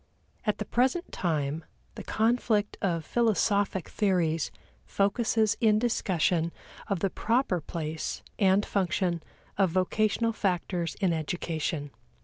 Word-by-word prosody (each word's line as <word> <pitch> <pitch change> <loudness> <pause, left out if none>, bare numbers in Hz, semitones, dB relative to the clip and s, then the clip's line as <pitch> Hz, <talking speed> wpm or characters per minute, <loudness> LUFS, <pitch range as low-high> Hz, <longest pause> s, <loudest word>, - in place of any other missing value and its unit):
At 210 - +2
the - - -4
present 265 +9 +1
time 155 -2 -1 0.3
the - - -8
conflict 220 -2 +1
of 170 -4 0
philosophic 205 -5 +1
theories 170 -6 +1 0.3
focuses 215 - +1
in 215 -2 +5
discussion 180 -7 +1 0.4
of 195 -4 -1
the 195 - +1
proper 225 -6 +1
place 155 0 -4 0.2
and 195 0 +4
function 180 -3 0 0.4
of 195 -2 +4
vocational 215 +5 +1
factors 180 -5 -1
in 185 -3 +3
education. 160 -2 -2
190 Hz, 115 wpm, -28 LUFS, 165-215 Hz, 0.4 s, in